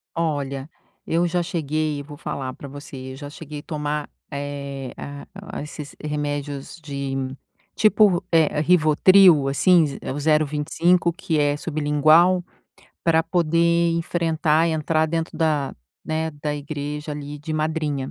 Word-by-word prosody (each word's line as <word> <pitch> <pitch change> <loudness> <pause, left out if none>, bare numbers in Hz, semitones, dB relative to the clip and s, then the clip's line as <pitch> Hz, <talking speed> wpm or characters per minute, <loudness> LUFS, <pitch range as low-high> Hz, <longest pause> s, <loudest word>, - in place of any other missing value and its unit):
Olha, 145 -4 -2 0.4
eu 170 +2 +2
já 175 +1 0
cheguei, 155 -3 -2
vou 145 0 -11
falar 130 -2 -4
pra 140 - -10
você, 140 0 -9 0.2
eu - - -8
já 145 +1 -8
cheguei 150 0 -8
tomar, 150 -1 -3 0.2
eh, 140 -2 -5
a 145 0 -8 0.3
a - - -4
esses 150 -1 -8
remédios 145 -1 -4
de 140 -2 -4 0.6
tipo, 210 -4 +4
eh, 160 -2 +3
Rivotril, 165 0 +6
assim, 160 +3 +4
z 140 - -7
o 145 - -4
025, 155 +3 +2
que 165 -3 -1
é 145 0 +2
sublingual, 155 +4 +3 0.6
pra 165 -1 +4
poder 170 0 +2
enfrentar 165 -1 +1
e - - +1
entrar 155 0 +1
dentro 165 +1 -3
da, 150 -4 0 0.3
né, 160 0 -1
da 150 -1 -1
igreja 150 +1 -5
ali 145 0 -6
de 150 +2 -6
madrinha. 155 -3 -1
150 Hz, 135 wpm, -23 LUFS, 145-165 Hz, 0.6 s, Rivotril